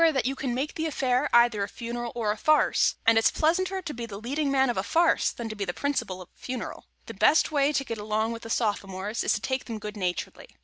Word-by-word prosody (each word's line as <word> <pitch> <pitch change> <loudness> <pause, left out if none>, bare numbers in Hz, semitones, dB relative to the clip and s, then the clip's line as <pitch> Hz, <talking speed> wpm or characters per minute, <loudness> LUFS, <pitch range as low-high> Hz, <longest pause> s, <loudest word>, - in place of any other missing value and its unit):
Remember 320 -4 +4
that 245 - +1
you 270 +2 0
can 260 -3 -2
make 275 +4 -2
the 320 0 -2
affair 260 -2 +1
either 235 -3 +5
a 200 - 0
funeral 240 0 -5
or 220 -3 0
a - - -1
farce; 305 +8 +3
and 225 0 +6
it's 225 - +4
pleasanter 370 +4 0
to 310 -3 -5
be 235 -1 -6
the 200 -2 -7
leading 280 +6 -1
man 265 -2 +3
in - - -6
a - - 0
farce 330 - +2
than 235 - -6
to 215 - -6
be 205 - -3
the 175 -3 -4
principal 235 -10 -2
at - - -21
a - - -30
funeral. 250 -1 -6 0.2
The - - -8
best 315 - +4
way 285 -1 +3
to 275 - 0
get 230 -3 -5
along 215 +2 -1
with 230 0 -6
Sophomores 205 -1 -1
is - - +2
to 205 - -2
take 260 +3 -2
them 230 -2 -5
good 210 0 -7
naturedly. 185 - -3
240 Hz, 260 wpm, -27 LUFS, 215-280 Hz, 0.2 s, and